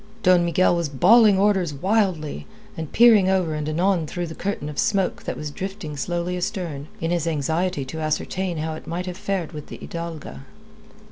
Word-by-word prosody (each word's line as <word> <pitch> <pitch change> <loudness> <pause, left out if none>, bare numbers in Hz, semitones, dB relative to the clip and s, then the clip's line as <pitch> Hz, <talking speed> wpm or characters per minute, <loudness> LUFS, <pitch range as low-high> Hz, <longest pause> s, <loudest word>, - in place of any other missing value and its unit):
Don 180 -2 +5
Miguel 175 +1 +3
was 170 -3 -1
bawling 205 - +6
orders 190 -6 +2
wildly, 180 - 0 0.3
and 160 -2 -6
peering 220 -5 +6
ever 185 -4 +1
and 150 0 -3
anon 170 +1 +1
through 175 +3 -3
the 160 - -7
curtain 190 -5 -3
of 150 -1 -5
smoke 195 -3 +1
that - - -3
was 150 -1 -5
drifting 190 -3 -6
slowly 175 +4 -2
astern, 175 -7 -4
in 165 +1 -1
his 170 -2 0
anxiety 160 0 -1
to 160 +5 -6
ascertain 170 +3 -2
how 160 +1 -2
it 155 - -9
might 175 +2 -3
have 180 -1 -5
fared 190 -4 -3
with 150 -3 -8
the - - -8
Hidalga. 165 - -7
170 Hz, 185 wpm, -23 LUFS, 155-190 Hz, 0.3 s, bawling